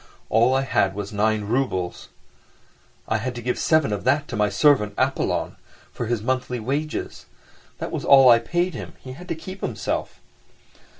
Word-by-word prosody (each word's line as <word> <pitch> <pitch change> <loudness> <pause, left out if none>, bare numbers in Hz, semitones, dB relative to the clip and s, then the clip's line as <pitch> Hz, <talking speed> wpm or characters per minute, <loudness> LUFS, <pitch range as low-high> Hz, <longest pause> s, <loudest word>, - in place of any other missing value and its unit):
All 120 +4 +3
I 135 - +2
had 100 -7 +1
was 100 +1 -5
nine 105 +1 +1
roubles, 100 -6 -2 1.0
I 110 - +1
had 125 +3 -4
to 120 - -6
give 125 +1 -1
seven 155 -9 +2
of 100 - -4
that 140 +3 +1
to - - -4
my 105 -1 +2
servant, 105 -1 +3
Apollon, - - -1 0.4
for 120 - -4
his 115 -2 -1
monthly 125 0 -1
wages. 140 +7 -4 0.5
That - - -5
was - - -3
all 135 -2 +7
I 120 -1 +8
paid 175 +9 -1
him—he 130 - -9
had 175 +8 -11
to - - -2
keep 185 +4 -9
himself. - - -3
125 Hz, 170 wpm, -23 LUFS, 105-140 Hz, 1.0 s, I